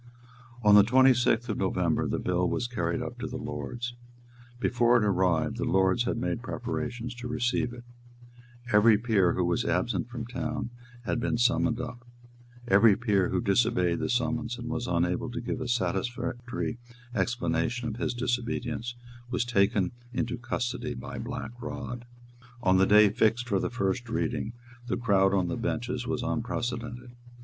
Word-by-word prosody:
On 105 -1 +6
the 105 - +10
twenty 130 +5 +6
sixth 120 -1 +1
of 110 - -2
November 90 -3 +1
the - - -1
bill 90 0 0
was - - -1
carried 95 -9 -2
up 120 - -7
to 130 - -3
the 130 0 -5
Lords. 120 0 -5 0.7
Before 120 -1 +3
it 115 - +2
arrived, 90 -5 +1
the - - -2
Lords 95 +5 +2
had 120 - -1
made 120 0 -2
preparations 120 -1 -4
to 120 0 -7
receive 120 0 0
it. 120 0 -10 0.9
Every 105 +1 +6
peer 105 -6 +2
who 90 - 0
was 85 0 +1
absent - - 0
from 120 -2 -5
town 120 -1 -4 0.3
had 120 - -1
been 120 - 0
summoned 120 0 +2
up: 125 -1 -6 0.6
every 100 0 +6
peer 100 -5 +1
who - - 0
disobeyed 100 -5 +2
the - - -2
summons 120 -1 -1
and 120 -1 -6
was 120 0 -2
unable 90 +5 0
to 120 0 -4
give 125 +2 -4
a 130 - -3
satisfactory 120 +4 -2 0.3
explanation 120 +1 0
of 110 - -6
his 120 0 -2
disobedience 120 -1 -2 0.3
was 125 -1 0
taken 100 -4 +2 0.2
into 120 0 -1
custody 120 +1 -3
by - - -7
Black 115 -1 -5
Rod. 125 -1 -6 0.6
On 95 0 +4
the 95 - +5
day 105 0 +7
fixed 110 +4 +1
for 100 -4 +1
the - - -1
first 120 +1 -2
reading, 115 0 -2 0.3
the 95 - -1
crowd 100 -4 +3
on 95 -2 +1
the 85 - -2
benches 120 +1 -2
was 125 -1 -1
unprecedented. 120 0 -3
120 Hz, 165 wpm, -28 LUFS, 100-120 Hz, 0.9 s, the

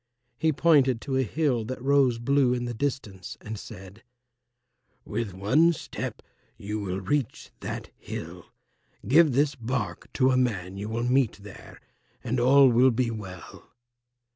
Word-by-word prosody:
He 160 - +2
pointed 140 -5 +3
to 135 -2 -3
a 130 - +3
hill 130 -1 0
that 130 +4 -5
rose 135 -2 +3
blue 125 +1 +2
in 120 0 -3
the 120 - -4
distance 110 -8 -4
and 110 +1 -7
said, 95 +1 -11 1.0
"With 105 -5 -4
one 145 - +3
step - - -6 0.3
you 105 +2 -4
will 95 -2 -3
reach 135 +4 -2
that - - -6
hill. - - -8 0.6
Give 155 +2 +5
this 145 +2 +2
bark 125 0 -4
to 130 -1 +3
a 130 - +2
man 95 -7 -1
you 100 +2 -5
will 115 +1 -2
meet 125 0 +2
there, 105 -2 -12 0.4
and 125 +1 -1
all 135 +3 +6
will 125 +2 +5
be 120 -1 0
well." 95 -6 -9
125 Hz, 150 wpm, -26 LUFS, 110-135 Hz, 1.0 s, all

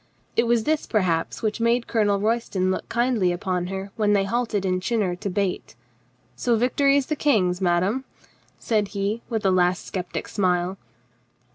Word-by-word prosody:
It 230 - +2
was 235 -1 +2
this, 310 +2 0
perhaps, 180 -6 0
which 215 +1 -1
made 235 +1 +2
Colonel 205 -3 +1
Royston 210 -4 0
look - - -4
kindly 235 -6 +1
upon 180 0 -2
her 195 +1 -5
when 210 -2 +2
they 200 -1 +3
halted 215 -1 -1
in 185 -1 +1
Chinnor 195 -2 0
to 200 +1 -4
bait. 190 - -2 0.6
"So 240 - +1
victory 275 +4 +3
is 280 - +1
the 305 - -2
King's, 195 -12 +1
madame?" 190 +8 +1 0.5
said 215 -3 0
he, 205 +4 -1
with 220 -3 -2
a 190 - +4
last 180 0 +2
skeptic 180 -2 -4
smile. 185 -1 0
205 Hz, 165 wpm, -24 LUFS, 185-235 Hz, 0.6 s, a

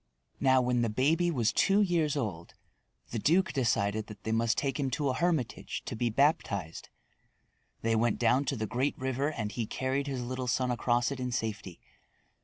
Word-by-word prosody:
Now 130 -1 +4
when 125 -1 +1
the 115 - +1
baby 155 +10 +2
was 120 -9 +1
two 200 +1 +4
years 165 -6 +1
old, 95 -10 -4 0.6
the 115 - -2
duke 175 - +2
decided 110 -4 0
that 105 - -11
they 110 - -2
must 115 +1 +1
take 135 -2 -1
him 135 -2 0
to 145 -2 0
a - - +1
hermitage 160 -4 -1
to - - -4
be 120 +2 0
baptized. 110 - 0 0.9
They 115 0 +2
went 115 0 +2
down 125 +4 +2
to 140 - -1
the 110 -3 -2
great 130 +6 -1
river 130 +3 -1
and 110 -7 -4
he 110 +2 -3
carried 135 +4 -2
his 135 -3 -3
little 130 +1 -4
son 125 +1 +1
across 120 +1 +1
it 140 - -4
in 125 0 -2
safety. 105 -6 -4
125 Hz, 190 wpm, -30 LUFS, 115-140 Hz, 0.9 s, Now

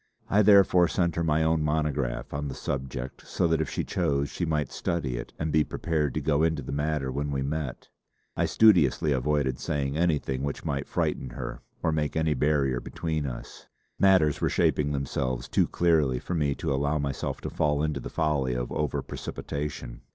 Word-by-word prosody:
I 105 - +5
therefore 95 -4 +6
sent 85 -2 0
her 85 - 0
my 80 0 +2
own 80 0 +2
monograph 75 -4 -1
on 70 +1 -2
the 65 - -5
subject 65 -1 -5
so - - 0
that 80 -1 +2
if - - -2
she - - -2
chose 70 -1 0
she 85 - -2
might 75 -4 -1
study 75 -8 -2
it - - -6
and 80 -1 -2
be 75 +1 +4
prepared 75 -3 -1
to - - 0
go 75 -1 +2
into 80 -3 +1
the - - -6
matter 75 -1 -1
when 70 +2 -2
we 70 -1 -1
met. 70 -2 -4 0.5
I - - +1
studiously 85 - +4
avoided 70 -1 0
saying 70 -2 -2
anything 75 -6 0
which 70 0 -4
might 70 0 -2
frighten 65 - -1
her - - -6 0.2
or 80 - +2
make 75 -2 -1
any 80 -1 +2
barrier 70 -4 +1
between 80 +2 -3
us; - - -8 0.3
matters 95 -7 +4
were - - +2
shaping 75 -1 +2
themselves 65 -3 -2
too - - +2
clearly 80 -7 +2
for 90 - -5
me 75 -4 +1
to - - -2
allow 70 +3 +1
myself 70 -2 -3
to - - -5
fall 75 -1 +1
into 75 -2 -1
the - - -6
folly 70 -5 0
of - - -3
over 75 -1 -1
precipitation. 70 -4 -5
75 Hz, 190 wpm, -27 LUFS, 70-80 Hz, 0.5 s, therefore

